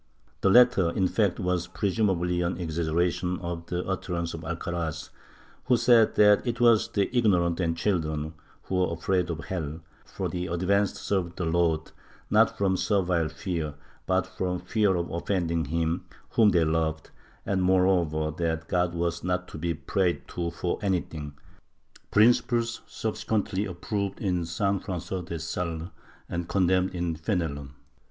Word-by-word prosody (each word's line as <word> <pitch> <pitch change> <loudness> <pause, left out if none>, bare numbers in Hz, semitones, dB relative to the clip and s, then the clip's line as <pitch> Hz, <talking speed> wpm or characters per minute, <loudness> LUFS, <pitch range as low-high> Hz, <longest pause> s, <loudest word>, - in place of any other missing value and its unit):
The 95 - +4
latter, 120 -5 +6
in 95 +2 +1
fact, 100 -2 +1
was 90 -1 0
presumably 90 -4 0
an 90 +1 0
exag 85 -2 -3
geration 90 +2 0
of 85 -1 -6
an 90 0 -2
utterance 85 -3 -2
of 80 - -6
Alcaraz, 80 -1 -4 0.5
who 125 -1 +4
said 115 -2 +5
that 105 -1 +6
it 120 0 -1
was 115 -3 +5
the 100 +4 -1
ignorant 90 -8 +3
and 85 -2 0
children 80 -5 -1 0.3
who 95 - -1
were 90 -2 +1
afraid 90 +1 0
of 80 -2 -3
hell, 80 -3 -4 0.2
for - - -4
the 90 0 -3
advanced 95 +3 +1
served 90 -4 -2
the 90 - -1
Lord, 80 -1 +1 0.4
not - - +4
from 95 -2 +1
servile 90 -6 +1
fear 80 -3 -4 0.3
but - - +2
from 90 -1 -3
fear 105 -4 +2
of 85 -1 -1
offending 85 -2 -1
Him 80 +3 -1 0.2
whom 110 -2 +5
they 85 -4 +3
loved, 80 0 -1 0.3
and 95 -2 0
moreover 90 -4 +2
that 80 -1 -1
God 90 -1 0
was 85 0 -1
not 90 0 -1
to - - -8
be 85 +1 -1
prayed 90 +3 -1
to 85 -1 -2
for 85 +1 -3
anything 80 -7 -2 0.4
— - - -45 0.3
principles 115 +1 +3
subsequently 105 -2 -2
approved 100 +2 -3
in 90 -4 0
S. 85 0 -5
Frangois 95 -2 -1
de 85 -1 -4
Sales 85 +1 -4 0.4
and 85 0 -4
condemned 95 0 +2
in 85 -2 -1
Fenelon. 80 -5 -3
90 Hz, 155 wpm, -27 LUFS, 85-95 Hz, 0.5 s, latter